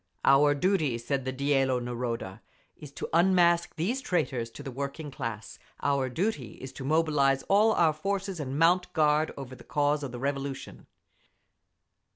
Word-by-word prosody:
Our 145 +1 +5
duty 155 -6 +1
(said 130 +3 -3
the 130 - -1
Dielo 135 -1 +1
Naroda) 120 -4 -4 0.3
is 150 -2 -11
to - - -5
unmask 175 0 +3
these 220 +12 -1
traitors 135 - -1
to 130 +5 -11
the 135 - -6
working 140 +3 -5
class. 115 -4 -6 0.2
Our 140 -2 +1
duty 145 - -2
is 130 0 -10
to 135 - -8
mobilise 140 -2 +2
all 215 +3 +4
our 165 -5 +3
forces 195 +3 -3
and 140 -1 -4
mount 180 +3 +3
guard 155 0 +2
over 135 -2 -7
the - - -14
cause 145 0 0
of 140 -3 -5
the 120 - -6
Revolution! 140 +1 -4
145 Hz, 160 wpm, -28 LUFS, 130-165 Hz, 0.3 s, Our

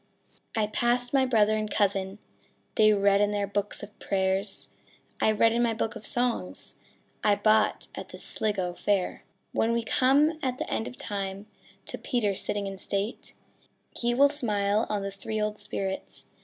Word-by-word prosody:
I 215 - +3
passed 240 +3 0
my 265 -1 +4
brother 215 -3 +4
and 215 0 -2
cousin: 195 -1 0 0.6
They 215 -1 +5
read 200 -1 +4
in 205 - +3
their 205 -1 0
books 205 +1 -2
of 205 0 -11
prayers; 195 +1 -1 0.5
I - - +4
read 220 +1 +4
in 235 - +2
my 230 -2 +2
book 225 +1 -2
of 220 -2 -5
songs 235 - 0 0.5
I 205 -1 +5
bought 215 +1 +2
at - - -7
the - - -9
Sligo 190 -5 -1
fair. 195 0 -1 0.3
When 230 +1 +1
we 235 0 0
come 285 +7 +3
at 255 -1 -1
the - - -3
end 225 - -2
of 250 - -9
time, 195 -1 -4 0.4
To - - -6
Peter 225 -6 0
sitting 200 +1 -2
in 195 -1 -5
state, 200 +4 -3 0.6
He 240 0 0
will 280 +3 +7
smile 210 -6 +1
on 205 -2 -1
the 195 - -3
three 215 +3 -4
old 210 0 -1
spirits. 195 -2 -4
210 Hz, 170 wpm, -28 LUFS, 200-235 Hz, 0.6 s, will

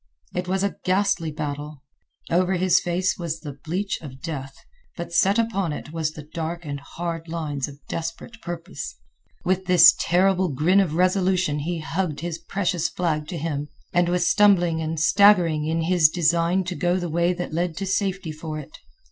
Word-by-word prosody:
It 180 - -3
was 190 +1 0
a 200 - -1
ghastly 185 -3 +1
battle. 150 -1 -5 0.5
Over 180 +2 +2
his 185 0 +3
face 180 +2 -1
was 165 -2 -4
the 145 -3 -8
bleach 190 +5 -2
of 135 -4 -10
death, 135 -3 -6 0.4
but 170 -1 -6
set 195 +4 +4
upon 200 -8 0
it 150 +1 -8
was 160 -2 -1
the 150 -1 -10
dark 170 +1 -4
and 145 -1 -4
hard 165 +3 -5
lines 150 -5 -3
of 140 -1 -11
desperate 165 +8 -6
purpose. 170 -2 -6 0.5
With 185 +1 +1
this 175 -2 +8
terrible 185 +1 +2
grin 155 +8 +3
of 175 -6 +1
resolution 185 -3 +2
he 165 +2 -3
hugged 160 -1 -2
his 170 -1 -4
precious 180 -1 -1
flag 155 -4 -1
to 175 - -5
him 150 -2 -3 0.3
and 175 -1 +3
was 180 0 +1
stumbling 175 -6 +4
and 160 0 -2
staggering 170 -3 +4
in 165 +1 0
his 165 -2 +4
design 170 +2 +2
to 180 0 -4
go 175 +1 +1
the 175 -1 -2
way 170 +2 +1
that 175 -2 -5
led 170 0 -1
to 195 - -2
safety 190 -3 -1
for 155 0 -6
it. 155 0 -10
170 Hz, 180 wpm, -24 LUFS, 155-185 Hz, 0.5 s, this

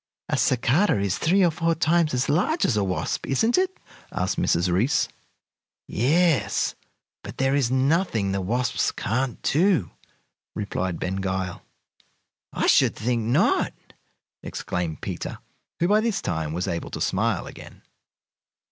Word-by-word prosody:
"A - - +1
cicada 130 - +2
is 100 -1 -1
three 185 +4 +3
or 170 - +3
four 165 +1 0
times 165 -3 +2
as 125 +2 0
large 205 - +1
as 120 - +1
a 105 - +1
wasp, 95 -1 -2
isn't 225 - +2
it?" 375 0 0 0.3
asked - - -1
Mrs. 85 +2 +1
Reece. 120 +12 +2 0.8
"Yes; 155 - +2 0.5
but - - -9
there 135 0 +1
is 140 -4 +2
nothing 130 - +1
the 95 0 -1
wasps 120 +6 0
can't 125 +3 -2
do," 165 - +2 0.6
replied 95 -4 -3
Ben 95 +1 -2
Gile. 95 -1 -3 0.9
"I - - -1
should - - +4
think 120 +1 -1
not!" 120 - +2 0.7
exclaimed 85 -3 -4
Peter, - - -5 0.4
who 170 - +2
by 210 +3 +4
this 220 -3 0
time 80 -2 -2
was 90 +3 -2
able 85 -1 -3
to - - -6
smile - - 0
again. - - -12
125 Hz, 140 wpm, -24 LUFS, -, 0.9 s, should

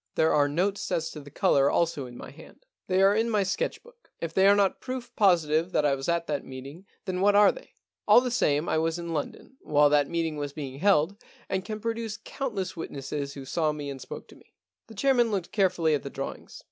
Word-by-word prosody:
There 160 - +3
are 145 -1 +3
notes 190 +7 -1
as 160 -1 -1
to 155 - -8
the 145 -1 -12
colour 140 0 +3
also 165 -6 0
in 120 0 -11
my - - -9
hand. - - -16 0.2
They 185 +1 +3
are 200 +1 +5
in 225 +2 +1
my 210 -3 +2
sketch 190 +1 -2
book. 485 0 -21
If 165 -1 -4
they 190 +2 +4
are 200 - +7
not 200 -2 +1
proof 255 -2 -6
positive 170 -4 +3
that 150 - +2
I 145 - +3
was 135 +3 -3
at 170 0 +1
that 145 -3 -3
meeting, 140 +8 -10 0.2
then 185 -1 -2
what 205 +1 +4
are 205 0 +7
they? - - -14 0.3
All - - +8
the 250 0 -2
same 150 - +1
I 160 - +1
was 165 +1 0
in 170 -1 -5
London 160 - -5
while 145 -1 +3
that 145 -1 +3
meeting 165 -2 -2
was 145 -1 -4
being 140 -3 -7
held, 195 +1 +2 0.3
and 190 0 -1
can 215 +1 -5
produce 225 -1 -3
countless 210 -9 -4
witnesses 140 -3 -5
who 135 -2 -8
saw 155 +2 0
me 145 -2 -5
and 135 -1 -8
spoke 130 - -8
to - - -15
me.' - - -23 0.3
The 220 - -13
chairman 245 0 +3
looked 195 -5 -3
carefully 180 -6 +2
at 145 - 0
the 140 - -7
draw 135 0 -4
ings. - - -14
170 Hz, 235 wpm, -27 LUFS, 145-205 Hz, 0.3 s, All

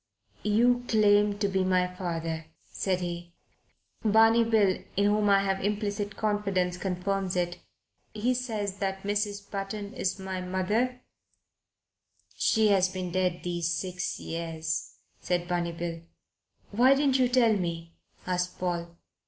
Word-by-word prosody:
"You 240 +4 +3
claim 205 -1 +4
to 205 - +1
be 190 -1 +1
my 185 -1 +3
father," 165 -3 -4 0.2
said 185 -2 -2
he. 175 0 -5 0.7
"Barney 225 +2 +5
Bill, 215 -4 +2 0.2
in 200 - +3
whom 205 0 +3
I 195 0 +5
have 195 -1 -1
implicit 205 0 -2
confidence, 200 -4 0
confirms 185 +1 -2
it. 175 -1 -1 0.5
He 225 +4 0
says 215 -6 -3
that 195 -1 -2
Mrs. 205 0 -2
Button 200 +1 -4
is 200 -8 -1
my 190 -1 -4
mother 210 +8 -1 0.6
" - - -39
"She 220 -1 +3
has 190 -2 +4
been 185 -1 -4
dead 180 -1 0
these 175 -1 -1
six 180 +1 -3
years," 165 -1 -4 0.2
said 175 -1 -1
Barney 175 -1 -1
Bill. 170 0 -5 0.7
"Why 250 +6 +5
didn't 275 -2 +2
you 255 - +4
tell 245 -3 +4
me?" 170 -3 -3 0.3
asked 180 0 -1
Paul. 170 -1 -3
195 Hz, 135 wpm, -28 LUFS, 180-210 Hz, 0.7 s, Barney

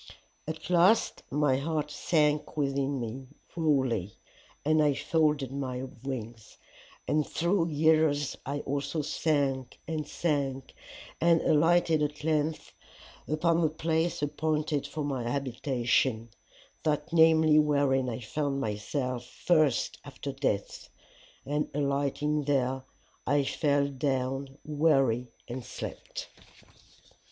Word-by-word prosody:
"'At 160 +2 -5
last 180 +6 +4
my 145 -2 +2
heart 150 +1 -2
sank 150 0 +1
within 140 -1 0
me 125 +3 -5 0.3
wholly, 130 - 0 0.5
and 155 +1 +4
I 145 -2 +3
folded 150 -5 +1
my 130 -2 -3 0.2
wings, 115 -4 -7 0.5
and 150 0 +2
through 170 0 +1
years 155 -2 +2
I 140 +2 -3
also 145 +3 -2
sank 140 -4 0
and 155 -2 -3
sank, 140 -6 -2 0.5
and 170 0 +5
alighted 165 0 +3
at 150 0 -2
length 155 0 -1 0.5
upon 165 +2 +2
the 160 - +3
place 160 0 -1
appointed 150 0 -1
for 155 - -4
my 140 -3 -2
habitation 125 -3 0 0.5
that 150 +1 -1
namely 160 -2 +6
wherein 140 -3 +2
I 120 +1 -5
found 140 +4 -2
myself 125 +3 -2
first 155 -4 +1
after 140 0 -6
death. 135 -7 -2 0.6
And 150 +2 -1
alighting 145 +1 0
there, 130 -2 +1 0.5
I 145 +1 +3
fell 140 0 +1
down 135 0 -2
weary 135 -6 +2 0.2
and 125 +1 -5
slept. 125 - -7
145 Hz, 110 wpm, -29 LUFS, 135-155 Hz, 0.6 s, namely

